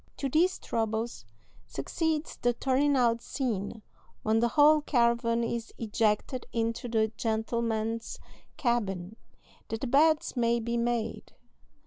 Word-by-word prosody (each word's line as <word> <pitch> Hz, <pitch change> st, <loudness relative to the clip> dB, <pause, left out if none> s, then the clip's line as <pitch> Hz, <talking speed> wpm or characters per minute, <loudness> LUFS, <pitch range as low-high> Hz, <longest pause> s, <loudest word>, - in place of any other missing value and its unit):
To 275 Hz, -, -1 dB
these 335 Hz, +7 st, +2 dB
troubles 220 Hz, -, -2 dB, 0.4 s
succeeds 315 Hz, -, -2 dB
the 245 Hz, 0 st, +1 dB
turning 275 Hz, +4 st, +2 dB
out 235 Hz, -2 st, +2 dB
scene, 220 Hz, -4 st, -3 dB, 0.4 s
when 220 Hz, +1 st, +2 dB
the 235 Hz, -, +3 dB
whole 300 Hz, +4 st, +5 dB
caravan 235 Hz, -3 st, +2 dB
is 230 Hz, 0 st, -3 dB
ejected 225 Hz, +2 st, 0 dB
into 230 Hz, +1 st, -1 dB
the 220 Hz, -2 st, +1 dB
gentlemen's 225 Hz, 0 st, -1 dB, 0.4 s
cabin, 210 Hz, -6 st, -1 dB, 0.5 s
that 225 Hz, -, -4 dB
the -, -, -1 dB
beds 300 Hz, +5 st, +3 dB
may 235 Hz, -1 st, +2 dB
be 235 Hz, +1 st, -2 dB
made. 235 Hz, -1 st, -2 dB
235 Hz, 120 wpm, -29 LUFS, 225-255 Hz, 0.5 s, whole